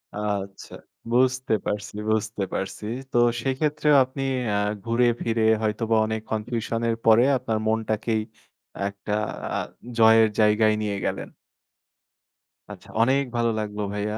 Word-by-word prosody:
আচ্ছা। 100 -2 -4 0.4
বুঝতে 130 -1 +2
পারছি, 105 0 -4
বুঝতে 110 -1 -1
পারছি। 95 +2 -4 0.3
তো - - 0 0.2
সেই 135 +1 0
ক্ষেত্রেও 150 -1 +2
আপনি 130 +1 -7 0.3
আ - - +2 0.3
ঘুরে 115 +2 +2 0.2
ফিরে 115 -1 0 0.2
হয়তোবা 110 +1 0
অনেক 110 0 -3
কনফিউশন 115 +1 -2
এর 115 - +1
পরে 115 +2 +6
আপনার 115 -3 -2
মনটাকেই 110 0 0 0.7
একটা 100 +1 -6 0.4
আ - - 0 0.4
জয়ের 110 0 +6
জায়গায় 110 0 +4
নিয়ে 100 -2 -2
গেলেন। - - -3 1.4
আচ্ছা - - -12
অনেক 135 +4 +3
ভালো 120 0 +2
লাগলো 105 0 -4
ভাইয়া। 105 +1 -2
110 Hz, 125 wpm, -24 LUFS, 105-120 Hz, 1.4 s, পরে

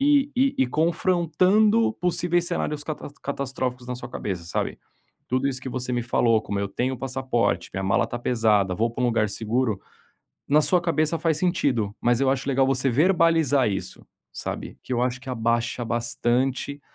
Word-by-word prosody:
e 285 0 +3
e 270 +1 +3
e 130 - +4
confrontando 185 - +2
possíveis 175 0 +1
cenários 150 -4 -2
cata 155 - -5
catastróficos 130 -3 -3
na 125 - -3
sua 120 0 -8
cabeça, 95 -7 -4
sabe. 85 - -3 0.5
Tudo 130 +2 +1
isso 130 -1 -3
que - - -5
você 125 0 -4
me 120 -1 0
falou: 115 -1 +2
"Como 100 -2 -3
eu 100 - -2
tenho 125 +5 -2
passaporte, 130 -2 -1
minha 95 - -2
mala 95 0 +2
está 120 - -5
pesada, 110 -6 +2
vou 115 +4 0
para 120 - -4
um - - +4
lugar 115 -3 +1
seguro", 110 0 -1 0.7
na 150 +2 +5
sua 180 +3 +2
cabeça 165 -1 0
faz 160 -2 +1
sentido, 125 - 0
mas 120 0 +2
eu 135 - +3
acho 135 +1 -2
legal 135 0 +3
você 135 0 +1
verbalizar 160 - +3
isso, 95 -1 -5 0.3
sabe, - - -6
que - - -9
eu 120 - 0
acho 125 0 -1
que 135 - -9
abaixa 120 0 -1
bastante, 120 +4 -1
130 Hz, 175 wpm, -24 LUFS, 120-160 Hz, 0.7 s, na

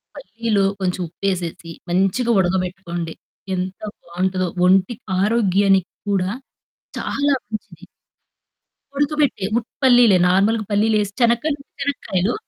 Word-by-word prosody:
పల్లిలో 225 - -1 0.2
కొంచెం 185 -1 -1
ఉప్పేసేసి, 175 -2 -3 0.2
మంచిగా 195 +7 +1
ఉడకబెట్టుకోండి. 180 -2 -2 0.4
ఎంత 185 +1 -4 0.2
బావుంటదో. 185 +1 -2 0.2
ఒంటి 190 +4 +4 0.3
ఆరోగ్యానికి 195 -3 +2 0.2
కూడా 190 -2 +1 0.7
చాలా 285 0 0
మంచిది. 215 0 -8 1.1
ఉడకబెట్టి. 290 -8 +1
ఉట్టి 235 - -4
పల్లిలే 245 -6 +6
నార్మల్‌గా 210 +4 +2
పల్లీలేసి 210 -1 +2
చెనక్కాయలు 240 +6 +2
ఉట్టి - - -25
చెనక్కాయలు. 215 -8 -1
195 Hz, 95 wpm, -20 LUFS, 185-230 Hz, 1.1 s, పల్లిలే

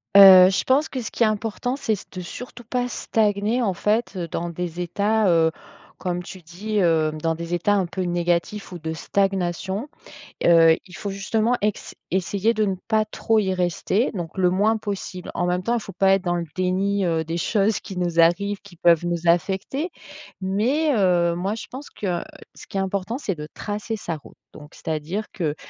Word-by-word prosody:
Heu, 190 -2 +10
je - - 0
pense 275 +4 +2
que 260 -3 -4
ce - - -5
qui 235 - 0
est - - +6
important 220 +4 -1
c'est 225 -6 0
c - - -11
de 185 - -6
surtout 240 +6 -9
pas 245 +2 -1
stagner, 215 0 0
en 195 -4 +1
fait, 215 +6 0
heu, 175 -2 -3
dans 170 +2 -3
des 175 0 -5
états, 205 +4 +1
heu, 165 -2 +4 0.5
comme 180 -1 -2
tu 185 0 -10
dis, 205 +6 -3
heu, 160 -3 +3
dans 165 - +2
des 170 +1 -5
états 205 +4 +1
un 190 -3 +1
peu 185 +1 -4
négatifs 175 +3 -1
ou 175 - -6
de 160 +1 -4
stagnation, 195 - -1 0.6
heu, 165 -1 +6
il 180 - -12
faut 200 - -4
justement 215 +4 0
ex 210 -1 -2 0.2
essayer 195 +5 +1
de 215 - +1
ne 195 -2 0
pas 215 -1 +3
trop 225 +1 0
y 190 -3 +1
rester, 180 +5 0
donc 170 -3 -5
le 180 -1 +4
moins 210 +4 +2
possible. 200 -3 -5
En 175 - 0
même 180 +1 0
temps, 235 +4 +1
faut 195 -3 -8
pas 195 +2 +3
être 195 - 0
dans 175 0 0
le 170 -1 -3
déni, 190 +2 +1
heu, 165 -2 +1
des 165 +2 -3
choses 200 +5 +1
qui 190 - -9
nous 175 -2 -1
arrivent, 200 +5 +2
qui 200 -3 -15
peuvent 170 0 +4
nous 170 -1 -1
affecter 190 - +1 0.5
mais 240 +12 +1
heu, 175 -3 +3
moi, 195 +4 -1
je 230 - -7
pense 270 +3 -8
que, 180 -4 -3 0.3
ce - - -12
qui 195 - -3
est - - +2
important 195 +4 -2
c'est 195 -10 -2
de 150 0 -6
tracer 210 +2 -4
sa 170 -5 -4
route, 150 - -15 0.2
donc 150 0 -13
c'est-à-dire 160 +7 -3
que, 155 -6 -2
190 Hz, 205 wpm, -23 LUFS, 175-215 Hz, 0.6 s, Heu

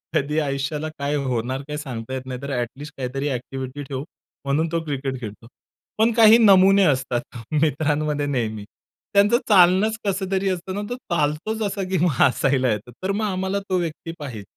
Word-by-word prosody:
कधी 150 +3 +1
आयुष्याला 145 +1 -2
काय 140 +1 -1
होणार 130 -1 -2
काय 150 0 -4
सांगता 130 -5 -6
येत 130 - -3
नाही. 130 -1 -6
तर 140 0 -5
ॲट 120 -1 0
लिस्ट 145 +1 -9
काहीतरी 135 +2 -2
ॲक्टिव्हिटी 130 +2 -5
ठेवु 135 -1 -5 0.4
म्हणून 145 +4 +1
तो 165 -1 -1
क्रिकेट 135 -3 -3
खेळतो. 110 0 -8 0.5
पण 225 +2 +4
काही 225 0 +8
नमुने 195 -3 +6
असतात 130 -5 -1 0.2
मित्रांमध्ये 150 -1 0
नेहमी. 110 -7 -2 0.5
त्यांचं 205 +4 +5
चालणंच 195 +3 +5
कसं 190 -1 -1
तरी 195 0 +1
असतं 185 0 -3
ना, 205 - -2
तो 245 - -2
चालतोच 175 - -2
असा, 200 0 -3
की 190 - +1
मग 175 +2 +3
हसायला 130 -1 +3
येतो, 105 +3 -4
तर 190 - 0
मग 210 +2 -1
आम्हाला 190 0 -1
तो 185 - +2
व्यक्ती 165 -1 -4
पाहिजे. 125 -8 -6
150 Hz, 175 wpm, -23 LUFS, 130-190 Hz, 0.5 s, काही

